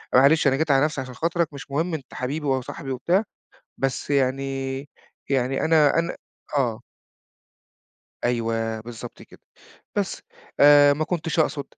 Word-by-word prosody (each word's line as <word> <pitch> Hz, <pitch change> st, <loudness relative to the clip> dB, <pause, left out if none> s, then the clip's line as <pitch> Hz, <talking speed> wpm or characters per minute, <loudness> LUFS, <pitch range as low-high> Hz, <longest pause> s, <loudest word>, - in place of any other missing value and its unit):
أ -, -, +8 dB
معلش 140 Hz, +3 st, +5 dB
أنا 135 Hz, -, +4 dB
جيت 160 Hz, +1 st, +1 dB
على 135 Hz, +2 st, +4 dB
نفسي 150 Hz, -3 st, -2 dB
عشان 130 Hz, -1 st, -8 dB
خاطرك 165 Hz, -1 st, -1 dB
مش 140 Hz, 0 st, -10 dB
مهم 160 Hz, +4 st, -1 dB
أنت 140 Hz, -5 st, -6 dB
حبيبي 145 Hz, +4 st, -3 dB
وصاحبي 135 Hz, +1 st, -2 dB
وبتاع، 170 Hz, -, +1 dB, 0.6 s
بس 135 Hz, +1 st, -2 dB
يعني 135 Hz, -1 st, 0 dB, 0.5 s
يعني 135 Hz, 0 st, 0 dB
أنا 160 Hz, -1 st, +4 dB
أنا 170 Hz, +1 st, -2 dB, 0.4 s
آه. 120 Hz, -4 st, 0 dB, 1.4 s
أيوه، 115 Hz, -2 st, -1 dB
بالضبط 115 Hz, 0 st, -9 dB
كده. -, -, -17 dB, 0.6 s
بس -, -, -2 dB, 0.4 s
آآ 145 Hz, 0 st, +8 dB
ما 155 Hz, +2 st, -1 dB
كنتش 165 Hz, -1 st, -3 dB
أقصد، 145 Hz, -2 st, +1 dB
140 Hz, 145 wpm, -24 LUFS, 130-155 Hz, 1.4 s, أ